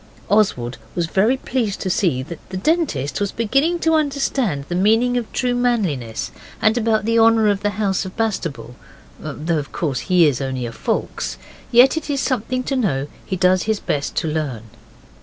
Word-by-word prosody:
Oswald 135 - +1 0.2
was 175 - 0
very 210 +10 +2
pleased 240 -6 -2
to 185 - -2
see 160 -9 +1
that 165 +3 -8
the 185 - -4
Dentist 205 - 0
was 200 - 0
beginning 275 +10 +1
to 325 - +2
understand 275 - 0
the - - -4
meaning 225 +7 +3
of 240 -3 -2
true 250 -1 0
manliness, 195 - -1 0.3
and 220 +1 +3
about 220 -3 +1
the 230 0 +3
honour 225 -1 +5
of 200 -1 0
the 205 - +1
house 200 -3 0
of 190 +2 -9
Bastable, 165 - -2 0.5
though 160 +1 -2
of 140 - -7
course 140 -7 -2
he 180 -2 +6
is 140 -3 +1
only 130 -2 -3
a 115 - -5
Foulkes. - - -3 0.3
Yet 250 +5 +6
it 315 -1 -4
is 280 -1 0
something 255 -1 -1
to 270 - -2
know 150 - 0
he 190 - -3
does 185 0 +3
his 215 -2 +1
best 145 -1 -2
to - - 0
learn. 150 -8 -2
205 Hz, 185 wpm, -20 LUFS, 155-245 Hz, 0.5 s, he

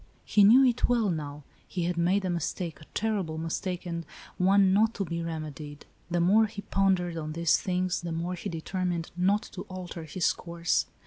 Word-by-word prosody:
He 205 - +4
knew 245 +7 +8
it 245 -1 +2
well, 230 -5 +2
now. 150 -2 -5 0.2
He 180 - -3
had 175 +1 0
made 185 +4 +2
a - - 0
mistake, 170 -1 -3
a - - -12
terrible 200 -8 -1
mistake, 175 +3 -3
and 170 -1 -3 0.4
one 190 +1 +5
not 220 +3 +3
to 200 - -2
be 170 0 -3
remedied. 155 -3 -6 0.2
The 175 0 0
more 205 +6 +5
he 205 -1 -8
pondered 185 -3 +1
on 155 -1 -4
these 170 0 +3
things, 180 -1 -1
the 170 -1 -4
more 170 +2 -2
he 180 - -5
determined 170 0 -3
not 195 +4 +2
to 185 - -6
alter 180 -3 -7
his 165 +3 +1
course. 170 -1 -1
180 Hz, 190 wpm, -28 LUFS, 165-195 Hz, 0.4 s, knew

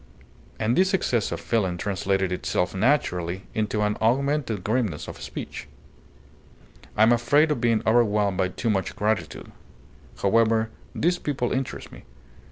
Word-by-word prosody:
And 115 +2 +1
this 190 +3 +3
excess 120 - 0
of - - -3
feeling 95 -7 0
translated 95 0 -1
itself 90 0 -1
naturally 95 - 0
into 105 -1 -1
an 105 0 0
augmented 125 -3 +1
grimness 110 -7 -1
of - - -9
speech. - - -7 1.3
"I 110 - +6
am 115 - +6
afraid 145 +6 +3
of 125 - -1
being 115 -2 +2
overwhelmed 105 -4 +2
by 95 - +3
too 110 +5 -2
much 95 -4 -2
gratitude. 105 -4 -2 0.7
However, 110 +2 +3 0.2
these 175 +2 +1
people 135 -5 -2
interest 130 -3 -3
me. - - -12
110 Hz, 140 wpm, -25 LUFS, 95-120 Hz, 1.3 s, I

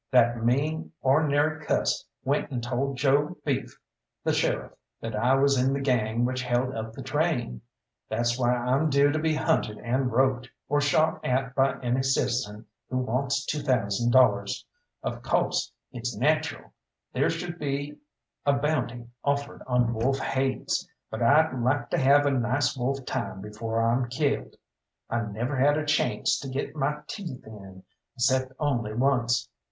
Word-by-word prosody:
That 120 -2 +3
mean, 150 +7 0
or'nary 150 +2 +2
cuss - - 0 0.2
went - - 0
and 125 -3 -4
told 130 +3 -2
Joe 140 +3 +2
Beef, - - -2 0.5
the - - +1
sheriff, - - 0 0.3
that 115 -1 -5
I 125 +5 +3
was 140 0 +3
in 135 +1 +2
the 140 - -1
gang 120 -3 +1
which 130 +1 -1
held 125 +1 0
up 110 0 -5
the 135 - -8
train. 130 - -1 0.5
That's 120 +2 +1
why 120 -1 +2
I'm 125 +5 +1
due 140 0 +4
to 155 - 0
be 160 0 +1
hunted 155 -10 0
and 125 +2 -1
roped, 130 +1 +2 0.2
or 145 +1 +2
shot 155 +2 +2
at 130 0 0
by 135 -1 +2
any 125 +1 +1
citizen 120 -5 0 0.2
who 130 - -1
wants 130 +3 0
two 150 0 -2
thousand 120 -4 +1
dollars. 110 -6 +3 0.4
Of - - -3
co'se, - - 0 0.2
it's 120 -2 -4
nacheral 155 +6 0 0.4
there - - +2
should 175 +1 -4
be 140 0 -3 0.4
a 140 - +3
bounty 140 -4 -1 0.2
offered 140 0 -1
on 125 -2 +2
wolf 125 +4 +1
haids, 135 +8 -1 0.2
but 110 +1 -4
I'd 150 +7 +5
like 130 +1 0
to - - +1
have 140 +2 +5
a 145 - +3
nice 130 +1 +1
wolf 135 +1 -2
time 120 -7 -3
before 105 +3 -3
I'm 120 +2 +1
killed. 140 +3 -1 0.6
I 120 0 +1
never 115 +7 -3
had 145 +3 +4
a 155 - -1
chance 150 0 +1
to 135 - -6
get 135 +3 -4
my 150 +1 -1
teeth 170 - -7
in, 95 -4 -11 0.3
'cept 130 +2 +2
only 120 -8 -1
once. 120 -2 +2
130 Hz, 160 wpm, -27 LUFS, 120-145 Hz, 0.6 s, I'd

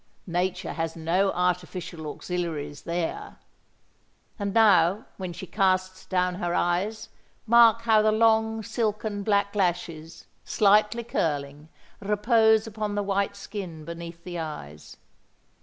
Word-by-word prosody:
Nature 180 +1 -2
has 165 +1 -3
no 175 +4 +1
artificial 180 -2 -2
auxiliaries 150 -3 -4
there! 170 -1 -3 1.0
And 200 -1 -2
now 200 -1 +4
when 185 -2 -5
she 175 - -8
casts 185 -1 0
down 180 -1 +1
her 175 0 -1
eyes, 190 +5 -1 0.4
mark 230 0 +6
how 220 -2 +4
the 215 0 +3
long, 220 0 +2
silken 215 -1 -2
black 200 0 +1
lashes, 170 -4 -2 0.2
slightly 210 +3 +3
curling, 145 -7 -3 0.3
repose 220 +2 +3
upon 215 -1 -4
the 205 - 0
white 200 0 -1
skin 185 -6 -7
beneath 170 0 -8
the 175 -1 -6
eyes. 75 - -8
185 Hz, 120 wpm, -26 LUFS, 170-215 Hz, 1.0 s, mark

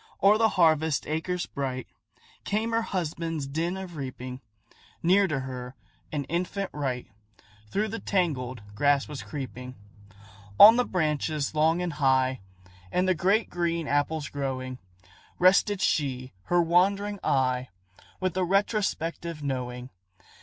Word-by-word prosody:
O'er 205 +2 +6
the 225 -1 +4
harvest 160 -3 +3
acres 170 +3 -2
bright, 130 -3 -4 0.6
Came 220 +3 -1
her 230 0 +2
husband's 165 -6 -3
din 165 +6 -2
of 185 -3 -7
reaping; 130 -2 -6 0.6
Near 190 +3 +4
to 145 -5 -1
her, 130 -1 -7 0.4
an 145 -2 -2
infant 180 +6 -3
wight 130 -4 -3 0.6
Through 215 - 0
the 225 +2 -4
tangled 130 - -1
grass 140 +5 +2
was 150 -3 -6
creeping. 125 -3 -7 0.8
On 220 +3 +11
the 250 0 +2
branches 155 -3 -1
long 160 +3 +2
and 175 -3 -2
high, 130 -3 +2 0.5
And 180 +1 +1
the 185 - +4
great 195 +7 +2
green 170 -2 -1
apples 145 +1 0
growing, 130 -2 -4 0.6
Rested 190 +2 +4
she 130 -4 0
her 175 -1 +3
wandering 195 +4 +2
eye, 130 -1 +1 0.5
With 185 -2 -1
a 185 - +1
retrospective 175 -5 -1
knowing. 125 -2 -4
155 Hz, 130 wpm, -27 LUFS, 135-185 Hz, 0.8 s, On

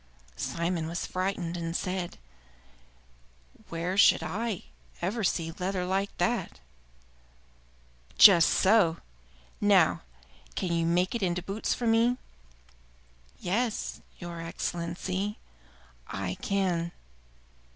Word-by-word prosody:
Simon 170 -1 -2
was 170 +2 -3
frightened, 185 -2 -2
and 165 -1 -4
said, 180 -1 -3 1.5
"Where 175 +4 -2
should 165 - +6
I 200 +4 -3 0.4
ever 205 +6 -2
see 165 -3 0
leather 185 0 -1
like 195 +2 0
that?" 235 - -1 1.6
"Just 175 -6 +9
so! 190 -5 +4 0.6
Now, - - +4 0.5
can 180 - -2
you 165 -1 +1
make 180 +2 +2
it 235 - -2
into 180 -2 0
boots 200 +3 -2
for 240 - -4
me?" 230 +2 +3 1.2
"Yes, 215 - -2 0.2
your 170 -2 -7
Excellency, 175 +4 -3 0.7
I 95 -1 -3
can." 180 -4 0
180 Hz, 100 wpm, -29 LUFS, 170-200 Hz, 1.6 s, Just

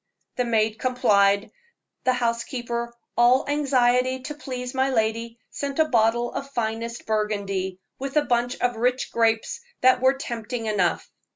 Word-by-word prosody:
The 250 - 0
maid 220 -2 +1
complied. 205 -4 +3 0.5
The 255 - +4
housekeeper, 235 0 -2 0.2
all 245 +2 +4
anxiety 260 -3 +2
to 280 +4 -5
please 255 -4 -6
my 265 0 +1
lady, 230 -1 -1
sent 280 -1 -4
a 315 - +5
bottle 235 -1 +2
of 275 - -5
finest 230 -2 -3
Burgundy, 200 -3 -2 0.2
with 275 +2 -3
a 295 - +3
bunch 245 +1 0
of 245 -2 +1
rich 250 +2 0
grapes 230 - +1 0.2
that 255 0 +5
were 260 +1 +4
tempting 235 -3 -5
enough. 200 -5 0
240 Hz, 145 wpm, -24 LUFS, 220-255 Hz, 0.5 s, a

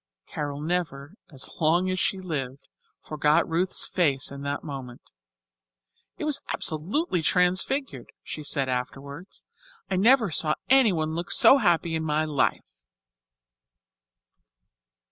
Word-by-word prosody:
Carol 145 -1 -5
never, 155 -3 -3 0.2
as 135 -3 -5
long 170 +3 +2
as 185 - -2
she 195 - 0
lived, 140 -8 -5 0.4
forgot 155 +2 +1
Ruth's 175 +3 0
face 145 -8 0
at 140 0 -8
that 140 0 -4
moment. 135 -5 -9 1.1
"It - - -4
was 300 -2 -1
absolutely 180 - -1
transfigured," 185 - 0
she 155 - -7
said 140 -2 0
afterwards. 135 +6 -6 0.5
"I 190 - +1
never 225 0 +4
saw 155 0 +2 0.2
anyone 185 -13 +3
look 170 +2 -4
so 270 - +7
happy 170 -5 +1
in 160 0 -1
my 155 0 0
life." 150 -3 0
160 Hz, 120 wpm, -25 LUFS, 145-185 Hz, 1.1 s, so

